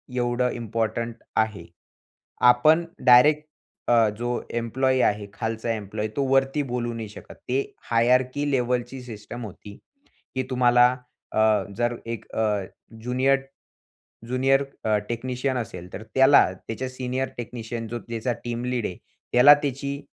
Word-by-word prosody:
एवढं 120 0 +1
इम्पोर्टंट 115 0 -2 0.2
आहे. 110 -6 0 0.9
आपण 155 +7 +4 0.2
डायरेक्ट 150 +5 +6 0.4
अ, 115 -2 +5
जो 120 0 -2
एम्प्लॉयी 130 +3 +1
आहे, 105 0 +1
खालचा 110 +1 -3
एम्प्लॉयी, 105 0 -4
तो 140 - +1
वरती 135 +2 +2
बोलू 120 -2 -3
नाही 110 -2 -5
शकत. - - -12
ते 135 +2 -1 0.2
हायरार्की 125 +5 +2
लेव्हलची 125 0 -1
सिस्टम 115 0 -8
होती, 100 +1 -12 0.6
की 130 - 0
तुम्हाला 125 -1 +5 0.5
अ, - - -2 0.4
जर 120 0 0
एक 115 -1 -5
अ, 110 - +2 0.6
ज्युनियर, 130 +3 +2 0.9
ज्युनियर 135 +2 +3 0.2
अ, 110 -1 +2
टेक्निशियन 125 +2 -2
असेल, 90 -6 -7
तर 105 - -7
त्याला 135 +2 +7
त्याच्या 115 +7 -6
सीनियर 130 0 -3
टेक्निशियन 115 -1 -5
जो 120 +1 -4
त्याचा 115 +1 -2
टीम 120 0 -3
लीड 125 -3 -1
आहे 90 - -6 0.4
त्याला 140 +4 +9
त्याची 140 +1 -3
120 Hz, 130 wpm, -25 LUFS, 115-130 Hz, 0.9 s, त्याला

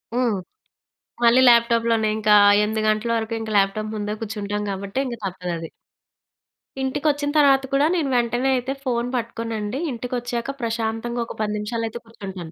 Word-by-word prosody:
హ్మ్. 240 -4 +1 0.9
మళ్ళీ 235 +2 +6
ల్యాప్‌టాప్‌లోనే 235 -2 +4
ఇంకా 210 -1 +4 0.3
8 215 +1 0
గంటల 215 +2 +1
వరకు 225 0 -3
ఇంకా 220 -1 -5
ల్యాప్‌టాప్ 215 +2 0
ముందే 210 0 -3
కూర్చుంటాం 210 -1 -3
గాబట్టే, 195 +4 -3
ఇంక 245 -2 -4
తప్పదది. 175 -3 -4 1.1
ఇంటికొచ్చిన 290 +2 0
తర్వాత 275 -2 +5
కూడా 275 +2 +4
నేను 310 -6 0
వెంటనే 240 +2 +1
అయితే 255 +2 -2
ఫోన్ 240 -2 -1
పట్టుకోనండి. 230 -1 -3
ఇంటికొచ్చాక 245 +1 -3
ప్రశాంతంగా 230 +1 -2
ఒక - - -8
10 210 -1 0
నిమిషాలయితే 225 +2 -3
కూర్చుంటాను. 190 -7 -8
230 Hz, 135 wpm, -22 LUFS, 210-245 Hz, 1.1 s, మళ్ళీ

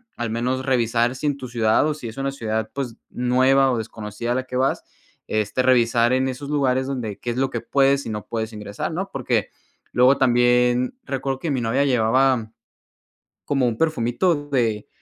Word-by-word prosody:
al 120 -1 -3
menos 125 +3 -1
revisar 120 -1 +1
si 130 - -6
en 145 - +1
tu 130 - -7
ciudad 115 +1 +2
o 155 - 0
si 125 - -7
es 110 - -9
una 135 0 -1
ciudad, 110 -4 -3
pues 130 -5 -4
nueva 130 +2 +3
o 125 - 0
desconocida 110 +1 -5
a - - -2
la 130 - -1
que 130 - -7
vas, 130 +1 +1 0.4
este 110 +3 0
revisar 120 -1 +3
en 130 +1 +2
esos 140 +2 -6
lugares 130 -3 +1
donde 120 -7 -4
qué 120 - -3
es 120 - -5
lo 135 0 +1
que 120 - -3
puedes 140 +2 +2
y - - -5
no 105 -1 -5
puedes 110 -1 -3
ingresar, 105 +8 -5
¿no? 190 +3 -3
Porque 120 - -1 0.4
luego 125 +2 +5
también 125 - +3
recuerdo 135 0 -3
que 165 - -2
mi 135 - 0
novia 120 +5 +1
llevaba 125 -1 +2 0.9
como 135 -3 +1
un 115 - -2
perfumito 145 +1 0
de 115 -6 0
125 Hz, 190 wpm, -22 LUFS, 115-135 Hz, 0.9 s, luego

